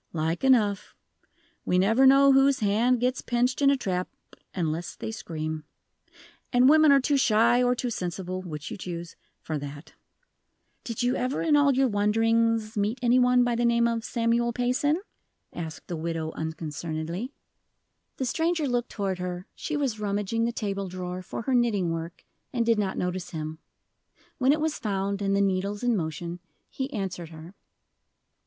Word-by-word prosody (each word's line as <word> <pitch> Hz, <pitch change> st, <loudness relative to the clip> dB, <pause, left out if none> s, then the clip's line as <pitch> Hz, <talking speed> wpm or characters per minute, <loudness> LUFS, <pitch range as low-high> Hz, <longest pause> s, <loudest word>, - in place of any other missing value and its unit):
"Like 165 Hz, +4 st, -1 dB
enough. 220 Hz, -7 st, +2 dB, 0.7 s
We 180 Hz, -, +1 dB
never 225 Hz, +8 st, +4 dB
know 275 Hz, +1 st, +7 dB
whose 270 Hz, 0 st, +5 dB
hand 225 Hz, +5 st, +2 dB
gets 250 Hz, +2 st, 0 dB
pinched 245 Hz, +3 st, 0 dB
in 275 Hz, -, +6 dB
a 280 Hz, -, +3 dB
trap 185 Hz, -6 st, -2 dB, 0.4 s
unless 165 Hz, -1 st, -3 dB
they -, -, -5 dB
scream. 155 Hz, -7 st, -5 dB, 0.9 s
And 250 Hz, 0 st, +5 dB
women 310 Hz, +1 st, +6 dB
are 280 Hz, -, +6 dB
too 280 Hz, +2 st, +1 dB
shy 235 Hz, 0 st, +4 dB
or 250 Hz, 0 st, +3 dB
too 245 Hz, 0 st, -3 dB
sensible 185 Hz, -1 st, -4 dB
which 150 Hz, -5 st, -7 dB
you -, -, -5 dB
choose 170 Hz, -2 st, -6 dB, 0.3 s
for 155 Hz, -2 st, -3 dB
that." 145 Hz, +2 st, -9 dB, 0.9 s
"Did 230 Hz, 0 st, -3 dB
you 245 Hz, +1 st, +2 dB
ever, 255 Hz, +2 st, -1 dB
in 315 Hz, -3 st, +3 dB
all 290 Hz, -1 st, +5 dB
your 265 Hz, 0 st, +3 dB
wanderings, 225 Hz, +1 st, +1 dB
meet 210 Hz, +3 st, 0 dB
any 245 Hz, +1 st, +4 dB
one 250 Hz, 0 st, +4 dB
by 245 Hz, 0 st, +1 dB
the 235 Hz, +1 st, 0 dB
name 235 Hz, 0 st, +3 dB
of 230 Hz, -1 st, -1 dB
Samuel 235 Hz, +1 st, +1 dB
Payson?" 250 Hz, +6 st, +1 dB, 0.5 s
asked 160 Hz, -2 st, -7 dB
the 175 Hz, -, -5 dB
widow, 160 Hz, 0 st, -3 dB
unconcernedly. 160 Hz, -, -4 dB, 0.9 s
The 260 Hz, -, -2 dB
stranger 325 Hz, +3 st, 0 dB
looked 245 Hz, -1 st, -1 dB
toward 195 Hz, -3 st, -3 dB
her; 180 Hz, 0 st, -4 dB
she 305 Hz, -, -4 dB
was 260 Hz, -7 st, -1 dB
rummaging 210 Hz, +2 st, -1 dB
the 235 Hz, -, 0 dB
table 200 Hz, -4 st, -3 dB
drawer 180 Hz, 0 st, -5 dB
for 185 Hz, -, -6 dB
her 265 Hz, -, -1 dB
knitting 215 Hz, -8 st, +2 dB
work, 165 Hz, +1 st, -6 dB, 0.3 s
and 235 Hz, -2 st, 0 dB
did 230 Hz, -2 st, +3 dB
not 195 Hz, -2 st, -1 dB
notice 180 Hz, 0 st, -3 dB
him. 155 Hz, -1 st, -5 dB, 0.8 s
When 260 Hz, +1 st, +4 dB
it 305 Hz, -, +2 dB
was 315 Hz, -1 st, -1 dB
found, 200 Hz, -1 st, -2 dB
and 195 Hz, 0 st, +1 dB
the 200 Hz, -, +2 dB
needles 200 Hz, +2 st, -1 dB
in 245 Hz, -2 st, +2 dB
motion, 170 Hz, 0 st, -4 dB, 0.3 s
he 265 Hz, +1 st, -4 dB
answered 180 Hz, -, -4 dB
her. 160 Hz, +2 st, -11 dB
215 Hz, 170 wpm, -27 LUFS, 180-250 Hz, 0.9 s, know